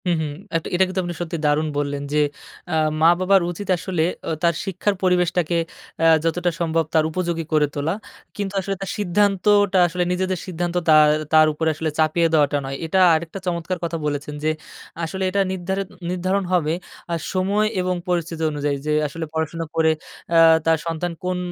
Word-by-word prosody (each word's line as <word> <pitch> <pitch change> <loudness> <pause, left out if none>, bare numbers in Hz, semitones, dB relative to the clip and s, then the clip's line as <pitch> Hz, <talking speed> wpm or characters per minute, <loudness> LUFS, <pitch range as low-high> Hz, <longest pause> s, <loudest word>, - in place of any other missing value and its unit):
হু, - - +3
হু। - - -1 0.3
আ - - +6 0.2
এটা 185 - +4
কিন্তু 185 +1 -3
আপনি 175 -1 -4
সত্যি 170 0 -3
দারুণ 150 +1 +2
বললেন 145 -1 -2
যে 150 - +3 0.5
আ - - +2 0.3
মা-বাবার 185 +4 +5
উচিত 190 +3 -7
আসলে 175 -2 -1 0.4
তার 170 0 +4
শিক্ষার 195 +2 -1
পরিবেশটাকে 180 -2 +2 0.7
যতটা 175 +2 +1
আ - - -11
সম্ভব 165 -1 +1
তার 160 - +4
উপযোগী 170 -1 -2
করে 150 -1 +4
তোলা। 150 +3 -1 0.4
কিন্তু 200 -1 -3
আসলে 195 +1 -3
তার 195 - -4
সিদ্ধান্তটা 205 0 +3
আসলে 180 +1 -1
নিজেদের 185 0 -1
সিদ্ধান্ত 175 -1 -3
তা 155 - +8 0.4
তার 155 0 +7
উপরে 160 +1 0
আসলে 155 +1 -2
চাপিয়ে 160 +2 +3
দেওয়াটা 145 -2 +3
নয়। 135 0 -4
এটা 175 +4 +1 0.2
আরেকটা 165 +4 -4
চমৎকার 175 +1 -2
কথা 170 0 -2
বলেছেন 145 0 -3
যে 155 - +2 0.5
আসলে 190 +4 -3
এটা 200 +2 +1
নিরধারি 190 +1 -2 0.3
নির্ধারণ 185 +2 0
হবে 160 -3 +2 0.4
আর 170 - -1
সময় 200 +3 +1
এবং 180 0 0
পরিস্থিতি 170 -2 -1
অনুযায়ী 145 -1 -1
যে 150 - +2
আসলে 160 +3 -5
পড়াশোনা 160 +1 -2
করে 160 -1 +4 0.7
তার 165 0 +4
সন্তান 165 +1 -2
আ - - -53
কোন 180 0 0
170 Hz, 175 wpm, -22 LUFS, 160-185 Hz, 0.7 s, তা